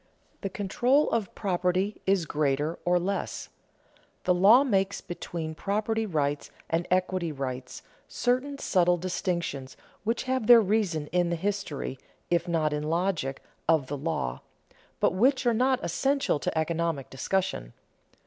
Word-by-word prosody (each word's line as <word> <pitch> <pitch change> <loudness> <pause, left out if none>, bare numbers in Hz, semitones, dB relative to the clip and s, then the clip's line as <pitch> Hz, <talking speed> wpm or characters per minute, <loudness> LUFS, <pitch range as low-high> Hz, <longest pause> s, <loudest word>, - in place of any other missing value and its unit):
The 195 - -2
control 245 +9 +1
of 215 -5 -1
property 185 +1 0
is 190 -3 +3
greater 150 +2 0
or 175 0 +4
less. 195 +3 -3 0.7
The 180 - +3
law 205 +9 +7
makes 195 -6 +1
between 170 -3 -5
property 215 +5 -1
rights 145 -5 -1 0.2
and 165 +1 0
equity 185 -2 +1
rights 130 -3 -5 0.2
certain 255 +3 0
subtle 180 -8 +2
distinctions 170 -7 -3 0.3
which 230 +2 -1
have 260 -4 -1
their 240 -1 +10
reason 195 -7 +1
in 175 -1 +2
the 170 - 0
history, 175 -8 -3 0.3
if 170 0 +2
not 160 -3 +1
in 150 - -1
the 150 - -4
logic, 165 -5 -1 0.3
of 160 -4 +4
the 145 +2 -4
law, 140 - -2 0.6
but - - +3
which 255 +8 +3
are 240 - +4
not 255 +3 +2
essential 275 - +1
to - - -2
economic 160 -3 -1
discussion. 135 - -2
180 Hz, 140 wpm, -28 LUFS, 160-210 Hz, 0.7 s, their